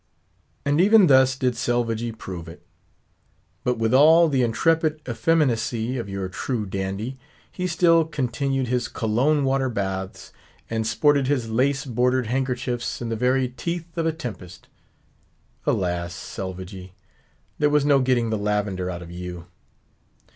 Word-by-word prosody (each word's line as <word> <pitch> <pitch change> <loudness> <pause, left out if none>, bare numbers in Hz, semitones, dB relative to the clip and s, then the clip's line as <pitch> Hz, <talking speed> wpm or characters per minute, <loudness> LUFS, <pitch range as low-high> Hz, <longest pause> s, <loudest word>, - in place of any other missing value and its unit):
And 145 +3 +3
even 210 +1 +6
thus 130 -3 +5
did 130 -2 0
Selvagee 115 -1 -1
prove 90 -6 -8
it. 85 - -14 1.0
But 125 -1 0
with 115 +1 0
all 160 +5 +7
the 135 -3 +1
intrepid 155 +7 +1
effeminacy 125 -3 0
of 110 -4 -5
your 95 -1 -3
true 110 +3 -3
dandy, 100 +7 -4 0.3
he 180 -1 -3
still 165 -1 +4
continued 135 -2 -1
his 125 0 0
Cologne 130 +7 +1
water 135 -1 +1
baths, 95 -4 -4 0.4
and 110 -1 -1
sported 140 +3 +2
his 125 -5 -1
lace 135 +5 +1
bordered 125 0 +1
handkerchiefs 125 0 -2
in 120 - -4
the 115 - -1
very 125 +2 +1
teeth 170 +7 -5
of 165 -1 0
a - - +2
tempest. 110 - -8 1.0
Alas, 85 -1 -1
Selvagee! 95 0 -7 0.7
there 150 - +3
was 145 -1 +2
no 140 -2 +5
getting 125 -3 +1
the 110 - -1
lavender 100 -3 -1
out 90 -1 -5
of 85 - -11
you. 90 -1 -7
125 Hz, 140 wpm, -23 LUFS, 105-140 Hz, 1.0 s, all